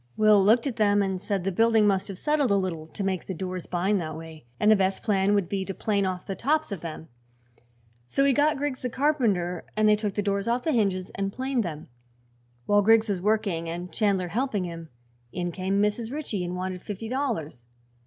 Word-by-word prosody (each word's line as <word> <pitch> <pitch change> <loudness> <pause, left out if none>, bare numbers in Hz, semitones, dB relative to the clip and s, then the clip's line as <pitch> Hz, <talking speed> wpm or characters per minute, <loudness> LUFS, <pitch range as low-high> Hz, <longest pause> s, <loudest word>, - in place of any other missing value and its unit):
Will 215 -2 +5
looked 225 +6 +4
at 260 -5 -3
them 205 -2 +3
and 190 -2 -2
said 200 -3 -2
the 195 - 0
building 225 +2 +4
must 195 -2 +2
have 195 -3 -7
settled 295 +2 +1
a 200 - +3
little, 175 -5 -2
to 200 - -6
make 190 -2 -2
the 190 - -4
doors 185 0 -5
bind 190 +2 0
that 155 -1 -5
way, 160 -5 -11
and 210 - +5
the - - +7
best 190 -1 0
plan 200 -2 +2
would 200 -4 +1
be 195 +1 -2
to 195 0 -6
plane 200 -3 0
off 185 -1 -4
the 195 - -3
tops 310 +4 0
of 195 -6 -4
them. 160 -1 -7 1.0
So 275 - +1
he 280 - +4
got 295 +2 +2
Griggs 280 -2 -3
the 250 - -2
carpenter 230 - 0
and 215 0 +4
they 210 - +6
took 210 -2 -3
the 205 - 0
doors 200 +1 -1
off 240 +1 0
the 320 - +1
hinges 195 -7 0
and 195 0 -2
planed 260 +1 -1
them. 155 -4 -6 0.8
While 205 0 +4
Griggs 225 +1 +4
was 190 -3 -1
working 200 -5 0
and 175 +1 -5
Chandler 195 -4 +1
helping 225 -1 -1
him, 165 -2 -7 0.4
in 175 -1 -3
came 190 +3 -1
Mrs. 210 +3 0
Ritchie 270 -10 -3
and 175 0 -4
wanted 185 0 -4
fifty 210 +3 -6
dollars. 215 - -3
200 Hz, 220 wpm, -26 LUFS, 180-225 Hz, 1.0 s, the